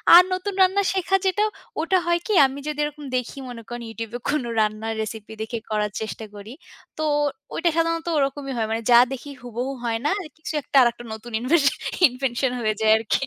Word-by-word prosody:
আর 355 Hz, -, +11 dB
নতুন 370 Hz, +2 st, -2 dB
রান্না 380 Hz, +2 st, +4 dB
শেখা 385 Hz, 0 st, +2 dB
যেটা, 395 Hz, +3 st, +2 dB, 0.4 s
ওটা 370 Hz, +4 st, +2 dB
হয় 345 Hz, 0 st, +2 dB
কি 430 Hz, -, 0 dB
আমি 270 Hz, +1 st, -3 dB
যদি 300 Hz, -1 st, -3 dB
এরকম 295 Hz, 0 st, -5 dB
দেখি 250 Hz, +2 st, -4 dB
মনে 235 Hz, -2 st, -8 dB
করেন 240 Hz, 0 st, -5 dB
ইউটিউবে 225 Hz, +1 st, -5 dB
কোন 290 Hz, -2 st, +1 dB, 0.2 s
রান্নার 215 Hz, +1 st, 0 dB
রেসিপি 220 Hz, 0 st, -6 dB
দেখে 220 Hz, +2 st, -3 dB
করার 210 Hz, -1 st, 0 dB
চেষ্টা 220 Hz, 0 st, -5 dB
করি। 205 Hz, +3 st, -9 dB, 0.4 s
তো 315 Hz, -, -2 dB, 0.5 s
ওইটা 345 Hz, -, +1 dB
সাধারণত 330 Hz, 0 st, 0 dB
ওরকমই 275 Hz, -1 st, -1 dB
হয়। 220 Hz, -1 st, 0 dB
মানে 225 Hz, +1 st, -1 dB
যা 235 Hz, -, +9 dB
দেখি 270 Hz, +2 st, -7 dB
হুবহু 245 Hz, +2 st, -4 dB
হয় 230 Hz, -1 st, 0 dB
না 295 Hz, -, +3 dB, 0.3 s
কিছু 315 Hz, -, -6 dB
একটা -, -, -9 dB
আরেকটা 240 Hz, -1 st, +2 dB
নতুন 220 Hz, +2 st, -9 dB
ইনভেশ 290 Hz, +5 st, +3 dB, 0.4 s
ইনভেনশন 255 Hz, 0 st, -1 dB
হয়ে 215 Hz, -2 st, +1 dB
যায় 215 Hz, 0 st, +5 dB
আরকি। 225 Hz, +4 st, 0 dB
250 Hz, 190 wpm, -23 LUFS, 225-315 Hz, 0.5 s, আর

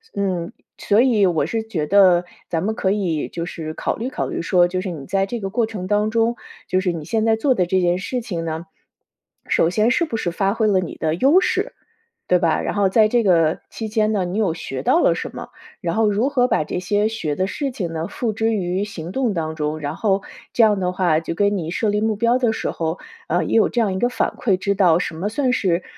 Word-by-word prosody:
嗯， 185 Hz, -4 st, -2 dB, 0.2 s
所 210 Hz, +2 st, +3 dB
以 235 Hz, -6 st, +4 dB
我 165 Hz, -6 st, +1 dB
是 225 Hz, +7 st, -2 dB
觉 185 Hz, -9 st, -3 dB
得 185 Hz, 0 st, +5 dB, 0.2 s
咱 165 Hz, 0 st, -2 dB
们 215 Hz, +3 st, 0 dB
可 190 Hz, -4 st, 0 dB
以 180 Hz, -7 st, -1 dB
就 170 Hz, -1 st, -5 dB
是 160 Hz, -3 st, -6 dB
考 -, -, -2 dB
虑 240 Hz, +4 st, -3 dB
考 -, -, -3 dB
虑 -, -, -3 dB
说 175 Hz, +1 st, +3 dB
就 185 Hz, +1 st, -2 dB
是 185 Hz, +1 st, -3 dB
你 150 Hz, -6 st, -7 dB
在 195 Hz, +4 st, 0 dB
这 235 Hz, +3 st, -5 dB
个 195 Hz, -, -3 dB
过 225 Hz, +3 st, +1 dB
程 210 Hz, -5 st, -6 dB
当 210 Hz, +1 st, +1 dB
中， 230 Hz, +1 st, +1 dB, 0.3 s
就 185 Hz, -, +2 dB
是 185 Hz, -2 st, 0 dB
你 160 Hz, -2 st, -5 dB
现 220 Hz, +5 st, 0 dB
在 225 Hz, 0 st, +4 dB
做 255 Hz, +4 st, +2 dB
的 180 Hz, -, +2 dB
这 185 Hz, +1 st, +1 dB
件 175 Hz, 0 st, +2 dB
事 245 Hz, +6 st, -3 dB
情 175 Hz, -7 st, -4 dB
呢， 160 Hz, +1 st, -4 dB, 0.8 s
首 165 Hz, -, +3 dB
先 215 Hz, +6 st, +2 dB
是 335 Hz, +6 st, +2 dB
不 275 Hz, -, -5 dB
是 175 Hz, -6 st, -1 dB
发 195 Hz, +3 st, 0 dB
挥 225 Hz, -1 st, 0 dB
了 195 Hz, -3 st, +3 dB
你 175 Hz, -, -6 dB
的 155 Hz, -1 st, 0 dB
优 280 Hz, -, +5 dB
势， -, -, -1 dB, 0.5 s
对 180 Hz, -, +4 dB
吧？ 165 Hz, -2 st, +1 dB
然 -, -, -2 dB
后 200 Hz, -2 st, +3 dB
在 215 Hz, +2 st, +4 dB
这 240 Hz, 0 st, +3 dB
个 165 Hz, -5 st, +3 dB
期 220 Hz, -, -5 dB
间 215 Hz, 0 st, +1 dB
呢， 200 Hz, -3 st, +1 dB
你 180 Hz, +4 st, -3 dB
有 200 Hz, -7 st, +1 dB
学 135 Hz, -5 st, -5 dB
到 335 Hz, -, +3 dB
了 -, -, +4 dB
什 -, -, -6 dB
么？ -, -, -7 dB, 0.3 s
然 170 Hz, -1 st, -2 dB
后 220 Hz, -1 st, +3 dB
如 220 Hz, +7 st, +1 dB
何 250 Hz, -3 st, +2 dB
把 155 Hz, -, +1 dB
这 -, -, -3 dB
些 205 Hz, +3 st, +1 dB
学 160 Hz, -10 st, -3 dB
的 185 Hz, -, 0 dB
事 280 Hz, +7 st, -3 dB
情 180 Hz, -8 st, -4 dB
呢， 160 Hz, +1 st, -3 dB
付 225 Hz, +1 st, -2 dB
之 225 Hz, +1 st, 0 dB
于 185 Hz, -1 st, -1 dB
行 175 Hz, -5 st, -7 dB
动 255 Hz, -6 st, 0 dB
当 160 Hz, -2 st, -2 dB
中？ 150 Hz, 0 st, -2 dB
然 145 Hz, 0 st, -4 dB
后 200 Hz, -3 st, +1 dB, 0.3 s
这 235 Hz, -, +4 dB
样 210 Hz, -2 st, +4 dB
的 180 Hz, -1 st, 0 dB
话， 175 Hz, -4 st, +2 dB
就 165 Hz, -, -4 dB
跟 205 Hz, +2 st, +2 dB
你 165 Hz, -3 st, -4 dB
设 215 Hz, +3 st, 0 dB
立 210 Hz, 0 st, +1 dB
目 220 Hz, -1 st, +1 dB
标 235 Hz, +3 st, +2 dB
的 245 Hz, -3 st, +1 dB
时 -, -, -3 dB
候， 165 Hz, +1 st, -3 dB, 0.3 s
呃， -, -, +1 dB
也 -, -, -1 dB
有 220 Hz, -, +5 dB
这 240 Hz, -, -1 dB
样 200 Hz, -4 st, +1 dB
一 190 Hz, -, -2 dB
个 245 Hz, -, +2 dB
反 -, -, 0 dB
馈， 200 Hz, -6 st, +2 dB
知 200 Hz, +2 st, -1 dB
道 180 Hz, -4 st, +4 dB
什 165 Hz, -, -3 dB
么 190 Hz, +5 st, -2 dB
算 255 Hz, +3 st, 0 dB
是， 185 Hz, -7 st, +1 dB
195 Hz, 275 characters per minute, -21 LUFS, 175-220 Hz, 0.8 s, 得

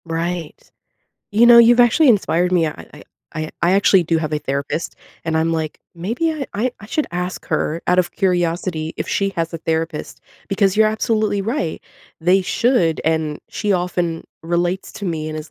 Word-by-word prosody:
Right. 165 Hz, 0 st, -4 dB, 0.7 s
You 220 Hz, +4 st, +5 dB
know, 240 Hz, 0 st, +9 dB
you've 235 Hz, +1 st, +7 dB
actually 245 Hz, +6 st, +5 dB
inspired 180 Hz, -5 st, +2 dB
me. 170 Hz, -3 st, +3 dB
I 150 Hz, -, -7 dB
I -, -, -12 dB, 0.3 s
I 155 Hz, 0 st, -4 dB
I 170 Hz, -, +4 dB
actually 195 Hz, -1 st, +4 dB
do 165 Hz, 0 st, 0 dB
have 155 Hz, -1 st, -3 dB
a 150 Hz, -, +1 dB
therapist, 140 Hz, +4 st, -3 dB, 0.3 s
and 160 Hz, -1 st, -1 dB
I'm 160 Hz, +1 st, +1 dB
like, 160 Hz, -2 st, -3 dB, 0.2 s
maybe 230 Hz, -, -1 dB
I 295 Hz, -4 st, -4 dB
I 235 Hz, +5 st, -1 dB
I 205 Hz, -, -10 dB
should 300 Hz, +7 st, -1 dB
ask 180 Hz, +1 st, -4 dB
her 160 Hz, +1 st, -1 dB
out 180 Hz, -, +3 dB
of 180 Hz, -1 st, +2 dB
curiosity 175 Hz, -3 st, -1 dB
if -, -, -4 dB
she 195 Hz, 0 st, 0 dB
has 165 Hz, 0 st, -2 dB
a -, -, -3 dB
therapist 160 Hz, 0 st, -3 dB, 0.3 s
because 195 Hz, -1 st, +1 dB
you're 215 Hz, 0 st, +5 dB
absolutely 215 Hz, -1 st, 0 dB
right, 195 Hz, -, -2 dB, 0.4 s
they 180 Hz, +4 st, +3 dB
should. 200 Hz, -4 st, +1 dB
And 160 Hz, -2 st, 0 dB
she 210 Hz, -2 st, -1 dB
often 175 Hz, -2 st, -1 dB, 0.2 s
relates 175 Hz, +3 st, -1 dB
to 205 Hz, -, -7 dB
me 160 Hz, -4 st, -3 dB
and 155 Hz, 0 st, -5 dB
is 155 Hz, 0 st, -9 dB
175 Hz, 185 wpm, -19 LUFS, 160-205 Hz, 0.7 s, know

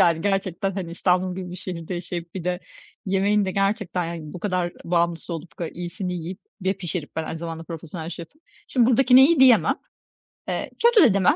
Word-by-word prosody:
Yani, 165 Hz, -2 st, +4 dB
gerçekten, 195 Hz, 0 st, 0 dB
hani, 185 Hz, -3 st, -4 dB
İstanbul 180 Hz, +1 st, +1 dB
gibi 185 Hz, -1 st, -5 dB
bir 180 Hz, -, -6 dB
şehirde 180 Hz, -1 st, -5 dB
yaşayıp 175 Hz, -1 st, -5 dB
bir 185 Hz, -, -5 dB
de 180 Hz, 0 st, -1 dB, 0.5 s
yemeğin 200 Hz, +2 st, +2 dB
de 190 Hz, -, -1 dB
gerçekten, 195 Hz, -2 st, 0 dB
yani, 165 Hz, -2 st, -6 dB
bu 180 Hz, -, -7 dB
kadar 180 Hz, -3 st, -1 dB
bağımlısı 170 Hz, 0 st, 0 dB
olup 160 Hz, -2 st, -8 dB
bu -, -, -29 dB
kadar 170 Hz, -2 st, -4 dB
iyisini 180 Hz, +2 st, -4 dB
yiyip 175 Hz, +2 st, -5 dB, 0.3 s
ve 190 Hz, -, +3 dB
pişirip, 175 Hz, -5 st, -5 dB
ben 160 Hz, -, -1 dB
aynı 160 Hz, -, -5 dB
zamanda 165 Hz, 0 st, -6 dB
profesyonel 165 Hz, 0 st, -7 dB
şefim, 175 Hz, -, -9 dB, 0.3 s
şimdi 245 Hz, -3 st, +3 dB
buradakine 255 Hz, +1 st, +7 dB
iyi 325 Hz, -3 st, +3 dB
diyemem. 255 Hz, -4 st, +6 dB, 0.7 s
Eee, -, -, -2 dB
kötü 470 Hz, -6 st, +7 dB
de -, -, +2 dB
demem 190 Hz, -2 st, +4 dB
180 Hz, 195 wpm, -24 LUFS, 170-195 Hz, 0.7 s, buradakine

